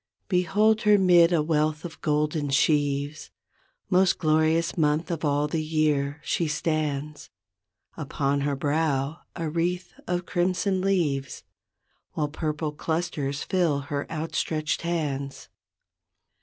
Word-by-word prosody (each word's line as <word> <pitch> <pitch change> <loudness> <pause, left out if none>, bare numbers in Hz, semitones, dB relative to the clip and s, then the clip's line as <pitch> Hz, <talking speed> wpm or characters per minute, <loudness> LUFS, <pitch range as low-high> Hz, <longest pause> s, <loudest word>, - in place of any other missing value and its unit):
Behold 210 +4 +3
her 210 -1 +5
'mid 175 -3 +5
a 165 -3 +2
wealth 155 0 0
of 160 -2 -9
golden 150 0 0
sheaves, 145 +1 +1 0.6
Most 185 -1 +3
glorious 160 +1 +2
month 155 +2 +1
of 165 -2 -3
all 145 0 +1
the 155 +1 -2
year, 155 -2 0
she 170 - 0
stands. 150 -1 -2 0.7
Upon 140 -2 -1
her 140 0 0
brow 145 +1 0 0.2
a 165 -2 -3
wreath 175 +3 -2
of 175 0 -1
crimson 185 +1 0
leaves. 160 -9 0 0.7
While 150 -1 -1
purple 155 0 -3
clusters 150 -2 -2
fill 170 -6 +1
her 140 0 -2
outstretched 155 -1 -2
hands. 145 -5 -3
155 Hz, 115 wpm, -26 LUFS, 145-170 Hz, 0.7 s, her